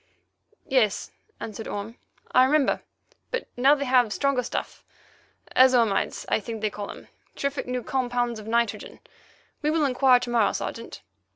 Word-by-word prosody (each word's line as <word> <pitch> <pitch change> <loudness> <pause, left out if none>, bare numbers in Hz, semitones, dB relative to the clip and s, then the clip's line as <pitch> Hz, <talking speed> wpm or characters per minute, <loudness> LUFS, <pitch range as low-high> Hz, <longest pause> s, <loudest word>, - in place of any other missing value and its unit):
"Yes," 235 -7 +1 0.3
answered 220 0 -6
Orme; 205 +3 -5 0.4
"I 255 0 +6
remember; 290 0 +2 0.5
but 485 - -3
now 270 +4 +5
they 280 -1 -3
have 250 -4 +3
stronger 275 +1 +1
stuffs—azo 255 0 0
imides, 200 -3 -2
I - - +1
think 220 +1 -6
they 215 -1 0
call 205 0 -6
them—terrific 280 -1 -6
new 250 -1 -3
compounds 245 -3 -1
of 215 - -10
nitrogen. 235 -1 -1 0.6
We 300 - +1
will 310 -1 +2
inquire 255 -1 +4
to - - -4
morrow, 230 -3 +3
Sergeant." 230 - -6
245 Hz, 145 wpm, -25 LUFS, 225-265 Hz, 0.6 s, I